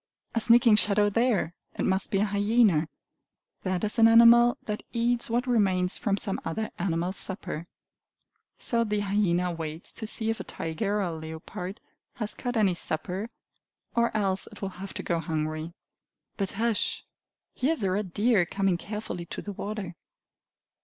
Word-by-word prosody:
A 230 - +1
sneaking 235 -1 +6
shadow 205 0 +4
there! 225 -7 +1 0.2
It - - 0
must 190 +1 +1
be 195 - +1
a - - +3
hyena. 205 -5 +3 0.7
That 185 0 -2
is 215 +2 -1
an 225 - +8
animal 235 +1 +7
that 210 -2 -4
eats 235 0 +1
what 240 +3 0
remains 190 -7 +1
from 200 -2 0
some 195 -1 -2
other 215 +7 -3
animal's 175 +1 -1
supper; 175 -4 -5 0.9
so 230 -1 +3
the 210 -2 -1
hyena 185 -3 +1
waits 160 0 -5
to 220 - -6
see 220 0 +1
if 225 - -5
a - - -4
tiger 195 +6 -3
or - - 0
a 175 -4 -2
leopard 160 +4 -7 0.4
has 215 -3 -2
caught 245 -2 -3
any 200 -4 +3
supper, 180 +6 -1 0.7
or 235 0 +3
else 195 -2 -1
it - - -13
will 195 - -1
have 195 - -7
to - - -4
go 170 -1 0
hungry. 155 0 -3 0.6
But 195 -2 -2
hush! 225 +1 0 0.5
Here 275 +6 +1
is 310 - -3
a 190 - +1
red 195 -1 -2
deer 205 -3 +2
coming 195 -1 0
carefully 210 -5 -6
to - - -6
the 205 - -6
water. 200 -2 -5
200 Hz, 165 wpm, -27 LUFS, 180-225 Hz, 0.9 s, an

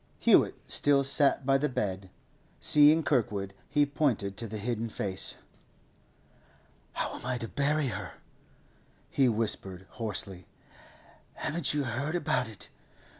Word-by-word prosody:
Hewett - - +4
still 140 -1 +4
sat 140 0 +2
by 135 0 +3
the 150 +1 0
bed; 95 -6 -3 0.5
seeing 150 +2 +5
Kirkwood, 105 -9 0 0.2
he 145 +1 +3
pointed 130 -9 -1
to 115 - -4
the 110 +1 -6
hidden 115 +1 -3
face. 95 -3 -2 1.6
'How - - -3
am - - -12
I 125 - -2
to 115 - -5
bury 145 +1 0
her?' - - -6 1.0
he 135 -3 +3
whispered 100 -4 -2
hoarsely. 100 -5 -3 0.9
'Haven't 160 -2 -1
you 145 - +1
heard 135 +7 -3
about 135 -8 0
it? 105 - -10
125 Hz, 125 wpm, -29 LUFS, 105-145 Hz, 1.6 s, seeing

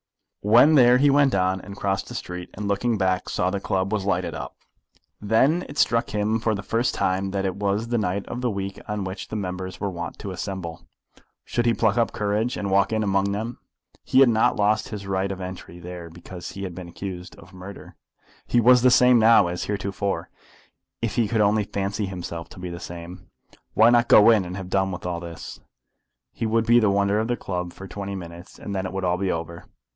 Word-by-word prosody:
When 120 +9 +6
there 125 -3 +6
he 140 +2 +4
went 140 -3 +4
on, 95 0 +1
and 100 0 -10
crossed 95 -1 -1
the - - -8
street, 90 0 -6
and 105 +1 -4
looking 110 +3 0
back 95 -1 0
saw 90 +1 0
the 100 - -2
club 95 +1 -1
was 105 -3 0
lighted 100 - 0
up. - - -7 0.7
Then 130 - +3
it 145 - -9
struck 115 -3 +2
him 105 +2 0
for 110 -1 0
the 100 - -6
first 115 +4 0
time 95 +1 0
that 95 0 -2
it 95 - -1
was 105 +3 -1
the 120 -1 +1
night 100 -1 -1
of 120 - -6
the 125 - 0
week 100 -2 -4
on 105 -2 -3
which 95 +1 -6
the - - -6
members 95 -2 -4
were 100 -1 -2
wont 85 0 -6
to 100 - -6
assemble. 90 -3 -5 0.6
Should 120 0 -1
he 115 - +3
pluck 110 +1 +2
up 115 - +2
courage, 105 +3 -1
and 100 -1 -3
walk 100 +1 +3
in 110 -1 0
among 100 0 +1
them? 115 +4 -4 0.4
He 130 +1 +4
had 135 - +7
not 110 -1 +3
lost 105 +1 +1
his 105 -2 -6
right 95 0 -1
of 95 - -5
entry 90 -1 -8
there 85 -1 -8
because 90 +1 -9
he 100 - -6
had 95 -2 -5
been 90 0 -8
accused 90 0 -7
of 90 +3 -16
murder. 95 +2 -11 0.5
He 120 - +3
was 125 +1 +6
the 125 - +6
same 125 -1 +6
now 110 -2 +6
as 90 0 -3
heretofore, 100 -1 -3 0.7
if 115 - -1
he 115 -3 +1
could 110 +1 +1
only 105 0 +3
fancy 100 +1 -2
himself 85 -3 -6
to - - -13
be 90 -1 -5
the 85 - -7
same. 85 0 -9 0.5
Why 115 +2 +6
not 120 0 +4
go 105 +2 +8
in, 105 -5 +3
and 90 +2 -6
have 95 -1 -7
done 95 0 +1
with 90 -1 -7
all 90 -1 -2
this? 85 -1 -9 0.7
He 115 - -2
would 115 +1 +1
be 120 +1 +6
the 110 -3 +3
wonder 100 +1 +2
of 110 - -1
the 120 0 -1
club 90 -2 -4
for 95 - -10
twenty 100 +1 -5
minutes, 85 -1 -10
and 100 - -6
then 95 0 -2
it - - -7
would 95 0 -3
all 90 0 +1
be 95 0 0
over. 85 0 -5
100 Hz, 225 wpm, -24 LUFS, 95-110 Hz, 0.7 s, go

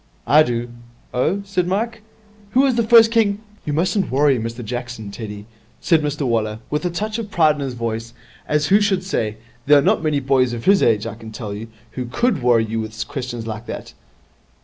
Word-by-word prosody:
'I 150 +3 +6
do.' 120 0 -2 0.4
'Oh?' 160 +11 +1
said 185 -3 -1
Mike. 220 +4 -2 0.5
'Who 260 - +5
was 275 -2 +3
the 235 - +2
first 225 0 +6
king 210 -3 +2
' 210 - -29
'You 150 - -1
mustn't 185 +6 +1
worry 135 -1 +3
Mr 115 +1 -5
Jackson, 120 -3 -5
Teddy,' 105 -1 -7 0.3
said 165 -2 +3
Mr 150 0 -2
Waller, 110 -3 0
with 150 +2 -1
a - - +2
touch 215 +6 -3
of 220 -3 -5
pride 160 -6 +4
in 145 - -7
his 135 -3 -3
voice, 115 -1 -4 0.3
as 150 -1 +1
who 205 +2 +5
should 195 -3 +1
say 110 - -2 0.3
'There 145 0 +7
are - - +5
not - - +2
many 155 -3 +1
boys 130 -2 +2
of 115 -1 -6
his 195 0 +5
age, 110 -2 +3
I 115 - -4
can 110 0 -11
tell 105 -2 -6
you, 110 +3 -7 0.2
who 125 - -4
could 195 - 0
worry 120 -2 +3
you 110 +1 -3
with 110 +1 -5
questions 125 -4 -5
like 110 +1 -6
that.' - - -7
135 Hz, 215 wpm, -20 LUFS, 115-190 Hz, 0.5 s, There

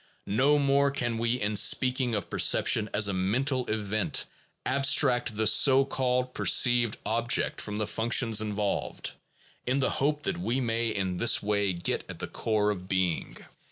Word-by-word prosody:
No 130 +9 +2
more 140 0 +2
can 120 -4 -2
we, 120 +2 -1
in 105 -1 -2
speaking 125 +3 +2
of 105 - -4
perception 110 -1 +2
as 105 0 +2
a 100 - -2
mental 125 +8 -1
event, 105 -2 -1 0.4
abstract 130 -4 +2
the 110 - 0
so 135 +5 +5
called 125 -1 -2
perceived 120 -3 +2
object 115 +2 0
from 105 - -6
the 105 0 -1
functions 115 0 +1
involved, 105 -1 -3 0.6
in 130 +2 +1
the 135 - 0
hope 150 +2 -1
that - - -1
we 115 +8 -2
may 115 -2 -1
in 95 -4 -3
this 115 +2 +2
way 100 -1 0
get 85 0 -3
at - - -8
the - - -5
core 105 -2 -1
of 95 -2 -7
being. 95 -3 -2
115 Hz, 160 wpm, -27 LUFS, 105-130 Hz, 0.6 s, so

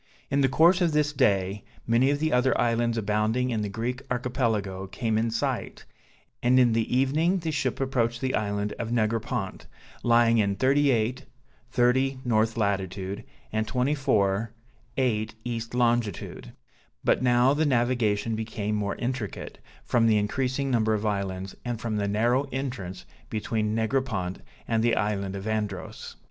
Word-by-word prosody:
In 140 +1 +2
the 135 - +4
course 170 +7 +5
of 170 -3 +2
this 150 -1 +2
day, 100 -5 +1 0.2
many 120 +4 +3
of 145 - +2
the 155 0 0
other 125 0 +3
islands 115 0 +1
abounding 110 +4 0
in 110 -2 -1
the 105 - -2
Greek 120 +5 -3
Archipelago 115 -6 -1
came 110 +3 -2
in 115 +1 +1
sight, 115 0 -3 0.6
and 125 +2 +4
in 120 -3 +4
the 115 0 0
evening 155 +8 +2
the 165 -3 -2
ship 135 -4 -1
approached 120 -3 0
the 130 0 -1
island 105 0 -1
of 115 - -3
Negropont, 115 -2 -1 0.3
lying 115 -1 +4
in 100 -2 +1
38 130 -1 +2 0.4
30 130 +2 +2
north 110 -1 +1
latitude, 100 -2 -2 0.3
and 110 0 0
24 115 -6 +1 0.5
8 110 -4 0
east 115 -1 -4
longitude; 120 -5 -1 0.5
but - - +2
now 125 +1 +4
the 150 +2 +1
navigation 120 -5 +1
became 110 -1 -3
more 100 -1 -1
intricate, 120 -4 -4 0.2
from 115 -2 +2
the 110 -1 +4
increasing 130 +6 -1
number 110 -3 +2
of 105 +1 -3
islands, 95 -2 -2
and 120 -2 -3
from 110 -2 -2
the 100 -1 0
narrow 120 +6 +2
entrance 120 -9 -5 0.2
between 110 0 -1
Negropont 110 -6 -1 0.3
and 115 -1 +1
the 120 -1 +3
island 100 -1 -1
of 100 0 -6
Andros. 105 -3 -4
115 Hz, 150 wpm, -26 LUFS, 105-130 Hz, 0.6 s, course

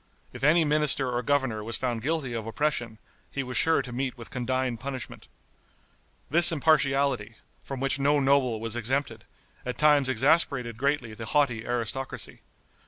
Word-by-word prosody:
If - - -10
any 160 +3 +4
minister 145 -3 +2
or 120 0 -1
governor 130 -5 0
was 115 +1 -4
found 120 -3 -2
guilty 145 -2 -2
of 115 -1 -5
oppression, 120 -3 -2 0.3
he 135 - -4
was 125 -1 -7
sure 160 +7 +3
to 125 - -8
meet 130 +1 -3
with 115 - -11
condign 130 -1 -2
punishment. 130 +1 -7 1.0
This 170 +4 +6
impartiality, 140 -7 +1 0.3
from 135 -2 -6
which 135 +1 -1
no 145 +1 +3
noble 135 -4 +2
was 115 0 -2
exempted, 120 -1 -2 0.4
at 125 - -5
times 150 -3 +4
exasperated 130 -2 +2
greatly 135 -3 -1
the 110 0 -7
haughty 120 -6 +1
aristocracy. 120 +2 -3
130 Hz, 155 wpm, -27 LUFS, 120-145 Hz, 1.0 s, This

